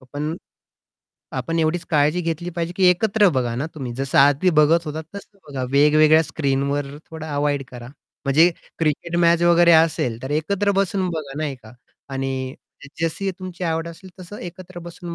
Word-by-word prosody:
अ, -, -, -18 dB
पण 150 Hz, +3 st, -3 dB, 1.0 s
आपण 130 Hz, +6 st, -2 dB
एवढीच 165 Hz, +2 st, 0 dB
काळजी 150 Hz, +3 st, +2 dB
घेतली 170 Hz, +1 st, -3 dB
पाहिजे 170 Hz, 0 st, -3 dB
की 190 Hz, -, +2 dB
एकत्र 205 Hz, +2 st, +3 dB
बघा 120 Hz, -2 st, 0 dB
ना, 140 Hz, -, -2 dB
तुम्ही, 130 Hz, -6 st, -5 dB
जसं 135 Hz, +1 st, -1 dB
आदी 145 Hz, +6 st, +5 dB
बघत 165 Hz, +3 st, +4 dB
होतात 155 Hz, +1 st, -5 dB
तसं 200 Hz, 0 st, -12 dB
बघा. 130 Hz, -2 st, -4 dB
वेगवेगळ्या 150 Hz, +2 st, +5 dB
स्क्रीनवर 140 Hz, -2 st, -1 dB, 0.2 s
थोडा 160 Hz, -1 st, -7 dB
अव्हॉइड 145 Hz, -1 st, 0 dB
करा 120 Hz, -1 st, -9 dB, 0.4 s
म्हणजे 155 Hz, +5 st, +5 dB, 0.3 s
क्रिकेट 165 Hz, +2 st, -1 dB
मॅच 170 Hz, 0 st, +3 dB
वगैरे 175 Hz, 0 st, +5 dB
असेल, 160 Hz, -8 st, +2 dB
तर 130 Hz, -, -5 dB
एकत्र 190 Hz, +7 st, 0 dB
बसून 195 Hz, -1 st, 0 dB
बघा 150 Hz, -4 st, -6 dB
नाही 150 Hz, -3 st, -2 dB
का 110 Hz, -, -14 dB, 0.4 s
आणि 135 Hz, 0 st, -3 dB, 0.3 s
जसं 160 Hz, +3 st, -3 dB
जशी 195 Hz, +4 st, -3 dB
तुमची 185 Hz, -1 st, -6 dB
आवड 165 Hz, 0 st, -1 dB
असेल, 175 Hz, +3 st, -12 dB
तसं 185 Hz, +4 st, -9 dB
एकत्र 180 Hz, +1 st, -9 dB
बसून 170 Hz, 0 st, -8 dB
160 Hz, 170 wpm, -22 LUFS, 140-175 Hz, 1.0 s, आदी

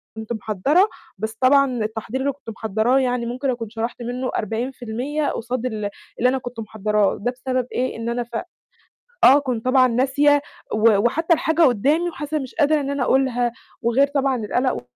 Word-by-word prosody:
كنت 220 Hz, +1 st, -5 dB
محضّرة، 225 Hz, -, +2 dB, 0.3 s
بس 220 Hz, +2 st, -4 dB
طبعًا 255 Hz, -3 st, +4 dB
التحضير 220 Hz, +4 st, -4 dB
اللي 280 Hz, +1 st, +1 dB
كنت 265 Hz, -4 st, -12 dB
محضّراه 220 Hz, +4 st, +1 dB
يعني 250 Hz, -2 st, 0 dB
ممكن 255 Hz, +3 st, -2 dB
أكون 230 Hz, -3 st, -3 dB
شرحت 230 Hz, +2 st, -4 dB
منه 250 Hz, +2 st, -3 dB
40% 245 Hz, +5 st, -3 dB
قصاد 245 Hz, +1 st, -3 dB
اللي 215 Hz, -4 st, -2 dB, 0.3 s
اللي 250 Hz, +2 st, +4 dB
أنا 265 Hz, -, 0 dB
كنت 245 Hz, -2 st, -7 dB
محضّراه، 210 Hz, -1 st, 0 dB
ده 245 Hz, -, 0 dB
بسبب 255 Hz, 0 st, -2 dB
إيه 255 Hz, +1 st, -1 dB
إن 230 Hz, +1 st, -3 dB
أنا 240 Hz, 0 st, -1 dB
ف 235 Hz, 0 st, -11 dB, 0.9 s
آه 275 Hz, +3 st, +8 dB
كنت 250 Hz, -4 st, -3 dB
طبعًا 255 Hz, 0 st, +5 dB
ناسية 280 Hz, +4 st, +3 dB, 0.3 s
و 215 Hz, -1 st, +4 dB
وحتى 325 Hz, -, +2 dB
الحاجة 320 Hz, +1 st, +1 dB
قُدّامي 295 Hz, +6 st, +3 dB
وحاسة 300 Hz, 0 st, -4 dB
إن -, -, -2 dB
مش 260 Hz, -, -10 dB
قادرة 305 Hz, -1 st, +3 dB
إن 275 Hz, -, -3 dB
أنا 280 Hz, -2 st, -1 dB
أقولها 245 Hz, -2 st, +2 dB, 0.3 s
وغير 255 Hz, +5 st, +3 dB
طبعًا 275 Hz, -2 st, 0 dB
القَلَق 245 Hz, -, -1 dB
250 Hz, 175 wpm, -22 LUFS, 230-275 Hz, 0.9 s, آه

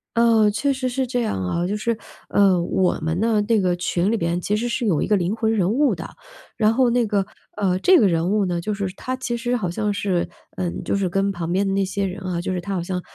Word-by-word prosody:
哦， 230 Hz, -2 st, +5 dB
确 275 Hz, +7 st, 0 dB
实 255 Hz, -1 st, -2 dB
是 260 Hz, +1 st, -1 dB
这 245 Hz, 0 st, -1 dB
样 100 Hz, -, -2 dB
啊， 170 Hz, -, -1 dB
就 200 Hz, +3 st, -1 dB
是， 225 Hz, +1 st, -1 dB, 0.3 s
呃， 190 Hz, -3 st, +4 dB
我 180 Hz, +1 st, +1 dB
们 160 Hz, +2 st, -1 dB
的 220 Hz, -2 st, +2 dB
那 225 Hz, 0 st, +2 dB
个 180 Hz, -1 st, +2 dB
群 175 Hz, +3 st, 0 dB
里 230 Hz, -, +1 dB
边 170 Hz, 0 st, -1 dB
其 210 Hz, -, 0 dB
实 240 Hz, +3 st, -1 dB
是 235 Hz, 0 st, -1 dB
有 170 Hz, -8 st, +2 dB
一 -, -, 0 dB
个 210 Hz, -, +3 dB
灵 185 Hz, 0 st, 0 dB
魂 225 Hz, -1 st, 0 dB
人 195 Hz, -3 st, +1 dB
物 280 Hz, +4 st, +2 dB
的， -, -, -7 dB, 0.5 s
然 220 Hz, 0 st, +3 dB
后 255 Hz, 0 st, +3 dB
那 240 Hz, -1 st, +2 dB
个 200 Hz, -2 st, +1 dB, 0.3 s
呃， 190 Hz, -3 st, 0 dB
这 370 Hz, -, +6 dB
个 205 Hz, -, +4 dB
人 170 Hz, +1 st, +1 dB
物 210 Hz, -1 st, +2 dB
呢， 175 Hz, -2 st, -1 dB
就 210 Hz, +5 st, -2 dB
是 200 Hz, -2 st, -3 dB
她 255 Hz, -, -3 dB
其 250 Hz, -2 st, -3 dB
实 245 Hz, +1 st, -1 dB
好 200 Hz, -7 st, -1 dB
像 210 Hz, +2 st, -1 dB
是 190 Hz, -4 st, -1 dB, 0.3 s
嗯， 180 Hz, -2 st, -3 dB
就 -, -, 0 dB
是 195 Hz, -, 0 dB
跟 195 Hz, +2 st, 0 dB
旁 170 Hz, -2 st, -4 dB
边 195 Hz, +2 st, +2 dB
的 195 Hz, -, 0 dB
那 195 Hz, 0 st, +1 dB
些 195 Hz, +1 st, -2 dB
人 190 Hz, +1 st, -4 dB
啊 175 Hz, -2 st, -2 dB
就 185 Hz, -, -3 dB
是 180 Hz, -, -2 dB
她 195 Hz, +3 st, -4 dB
好 175 Hz, -, -2 dB
像 180 Hz, 0 st, -3 dB
200 Hz, 290 characters per minute, -22 LUFS, 180-230 Hz, 0.5 s, 这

